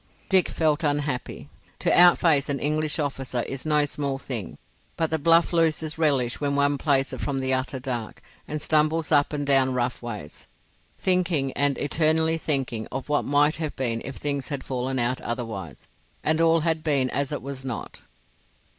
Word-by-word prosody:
Dick 190 -2 +5
felt 155 0 0
unhappy. 145 -4 -2 0.3
To - - +1
outface 170 -5 +5
an 140 -1 -1
English 155 +1 0
officer 135 -5 -2
is 135 +3 -6
no 150 -1 +3
small 140 -1 -3
thing, 125 -8 -6 0.4
but 160 -1 0
the 160 - 0
bluff 165 +3 +4
loses 160 -1 0
relish 135 -6 +1
when 140 -1 0
one 140 0 +2
plays 135 -2 +1
it - - -6
from 140 -2 -2
the 130 0 0
utter 130 +1 -1
dark, 120 -4 -5 0.2
and 150 +1 -4
stumbles 155 +1 +1
up 145 -2 +3
and 145 -1 -3
down 135 -2 +3
rough 125 0 -2
ways, 105 -11 -8 0.5
thinking 175 -7 +1
and 140 0 +1
eternally 160 +2 +1
thinking 130 -8 -1
of 135 +2 -5
what 150 - +1
might 145 +2 +3
have 155 -2 -4
been 115 -3 -1
if 135 +1 -7
things 140 -2 -3
had 140 -3 -5
fallen 130 0 -3
out 125 +1 0
otherwise, 110 - -6 0.4
and 160 +1 +2
all 165 0 +4
had 160 -1 -1
been 140 -5 +2
as 140 0 -1
it 145 - -4
was 135 -1 -6
not. 125 -4 -6
145 Hz, 175 wpm, -25 LUFS, 130-155 Hz, 0.5 s, Dick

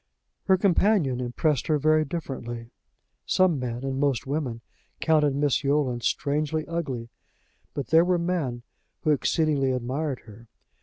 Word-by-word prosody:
Her 190 - +4
companion 185 - +2
impressed 125 +3 0
her 155 -2 +3
very 155 +1 +3
differently. 120 -7 -6 0.6
Some 185 -6 +3
men, 120 0 -4
and 135 0 -2
most 140 -1 +1
women, 135 -5 -3 0.4
counted 150 -3 +3
Miss 145 -1 +1
Yolland 140 -4 +1
strangely 150 +4 0
ugly. 135 -9 -3 0.7
But 140 -5 -4
there 160 +1 +6
were 180 0 +2
men 165 -9 -2 0.4
who 155 - +2
exceedingly 145 -2 +1
admired 130 +3 -2
her. 115 +1 -15
145 Hz, 135 wpm, -26 LUFS, 125-160 Hz, 0.7 s, there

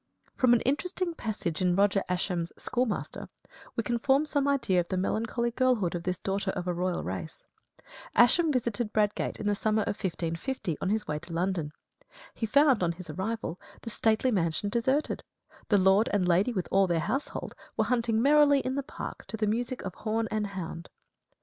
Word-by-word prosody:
From 250 -2 +4
an 240 - +4
interesting 345 +6 -1
passage 210 - -3
in 180 -1 +3
Roger 195 0 +3
Ascham's 180 -2 -1
"Schoolmaster," 245 -3 -2 0.5
we 230 - 0
can 240 +1 -1
form 275 +5 +3
some 285 -2 0
idea 245 -10 +2
of 175 - -1
the 185 - -2
melancholy 230 +5 -1
girlhood 240 -8 +1
of 175 - -3
this 180 +1 -2
daughter 195 +1 -2
of 180 -2 -3
a 180 - +1
royal 180 +1 -1
race. 95 - -6 0.7
Ascham 310 +7 +5
visited 235 -4 -1
Bradgate 210 -1 0
in 215 - -5
the 205 - +2
summer 215 +1 +1
of - - -3
1550 170 - -2
on 190 - 0
his 215 +1 0
way 150 0 -2
to 170 +1 -9
London. 170 -3 -1 0.6
He 225 - -3
found, 275 -1 +4
on 170 -1 +1
his 170 -1 -9
arrival, 190 +1 -3 0.2
the 230 - -6
stately 220 +4 +2
mansion 175 0 0
deserted; 260 +7 0 0.5
the 205 - +5
Lord 190 +3 +4
and 195 -3 +1
Lady, 185 +7 +3
with 185 -6 -2
all 195 0 +4
their 170 -2 +1
household, 265 - -3 0.2
were 220 - +2
hunting 230 -1 +1
merrily 285 -1 +5
in 260 - -2
the 280 - -1
park 275 - -8
to 220 - -5
the 215 - +1
music 235 +4 -2
of 190 - -5
horn 225 +1 -1
and 215 -1 0
hound. 175 -3 -6
210 Hz, 190 wpm, -29 LUFS, 180-245 Hz, 0.7 s, Ascham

